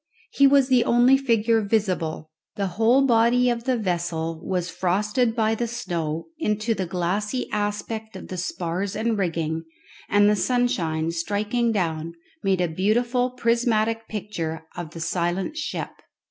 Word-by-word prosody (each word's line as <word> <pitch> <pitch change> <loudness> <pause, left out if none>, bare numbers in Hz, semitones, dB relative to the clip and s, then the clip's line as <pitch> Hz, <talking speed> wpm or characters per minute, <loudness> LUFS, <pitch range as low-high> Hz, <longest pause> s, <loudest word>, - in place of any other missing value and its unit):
He 280 - +5
was 275 -1 +5
the 255 -3 +4
only 245 +2 +5
figure 230 -4 +2
visible. 185 -7 -1 0.2
The 200 -2 -1
whole 235 +7 +4
body 245 +1 +4
of 235 0 -3
the 260 -2 +1
vessel 170 -5 -2
was 180 -2 -1
frosted 210 +7 0
by 220 -2 +2
the 235 +2 -1
snow 170 -9 -3
into 215 -4 0
the 190 -4 -3
glassy 195 +8 -1
aspect 210 +1 -3
of - - -9
the 185 - -5
spars 180 +2 -3
and 225 +1 0
rigging, 165 -4 -1 0.5
and 205 0 +5
the 210 - +4
sunshine 190 -10 0
striking 210 +7 0
down 165 -5 -2 0.3
made 190 -2 +1
a 175 - +2
beautiful 235 +9 +1
prismatic 230 -2 +1
picture 165 -7 -4
of 175 -3 -5
the 165 - -9
silent 175 - -1
ship. 320 - -4
210 Hz, 145 wpm, -24 LUFS, 175-235 Hz, 0.5 s, He